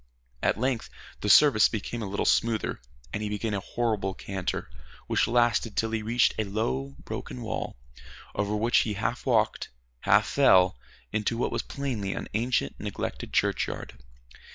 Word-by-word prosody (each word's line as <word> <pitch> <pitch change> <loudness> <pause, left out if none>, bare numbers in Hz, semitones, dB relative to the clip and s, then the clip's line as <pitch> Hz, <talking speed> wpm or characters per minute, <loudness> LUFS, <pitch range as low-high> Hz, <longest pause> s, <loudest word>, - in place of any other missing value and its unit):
At - - +2
length 125 -2 -1 0.3
the 105 - -2
surface 105 -1 +7
became 115 +2 -4
a 105 - -3
little 100 +1 -2
smoother, 115 - +1 0.3
and 105 - -2
he 105 - -2
began 105 +1 -2
a 100 - 0
horrible 105 -3 -1
canter 95 -2 -4 0.4
which - - +2
lasted 120 -2 +2
till 110 0 +1
he 110 -1 -1
reached 115 +3 +3
a - - +3
low, 70 - -2
broken 60 0 -6
wall, - - -4 0.6
over 100 +1 -1
which 115 +3 +3
he 105 -2 0
half 115 +5 -2
walked, 110 -4 +2 0.3
half - - +4
fell 90 0 +5 0.4
into 110 +2 0
what 120 - 0
was - - -1
plainly 120 -9 -3
an - - -5
ancient 115 - 0
neglected - - -4
churchyard. - - -1
110 Hz, 155 wpm, -27 LUFS, 100-115 Hz, 0.6 s, surface